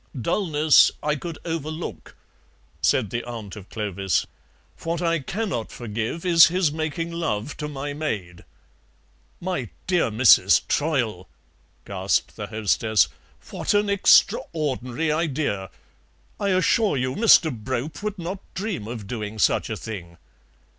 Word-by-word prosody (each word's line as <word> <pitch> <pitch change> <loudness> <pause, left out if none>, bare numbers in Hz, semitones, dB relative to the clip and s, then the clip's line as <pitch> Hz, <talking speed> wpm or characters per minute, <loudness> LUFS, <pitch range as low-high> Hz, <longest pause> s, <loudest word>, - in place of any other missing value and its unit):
"Dullness 155 - +4
I 150 0 +1
could 165 +2 -6
overlook," 160 0 -5 0.7
said 110 -7 +2
the 120 - -2
aunt 115 -4 -7
of 100 -2 -11
Clovis; 100 -4 -1 0.6
"what 165 0 -2
I 170 -1 +1
cannot 175 - -3
forgive 115 - -4
is 170 -2 +8
his 175 -2 +1
making 160 +2 -3
love 155 -8 -3
to 150 - -4
my 145 0 -5
maid." 105 - -4 1.0
"My 175 - -3 0.2
dear 175 -8 +2
Mrs. 115 +3 +5
Troyle," 120 - 0 0.6
gasped - - -1
the - - -6
hostess, 110 -1 +2 0.4
"what - - -1
an 205 0 +2
extraordinary 155 -7 +2
idea! 145 - -1 0.7
I 200 - 0
assure 190 -1 +2
you 130 0 -1
Mr. 175 - +5
Brope 130 - -4
would 210 -1 -3
not 180 +2 -5 0.2
dream 190 - -3
of 115 -3 -6
doing 110 0 -5
such - - +2
a - - -3
thing." 85 -6 -8
145 Hz, 125 wpm, -24 LUFS, 110-170 Hz, 1.0 s, is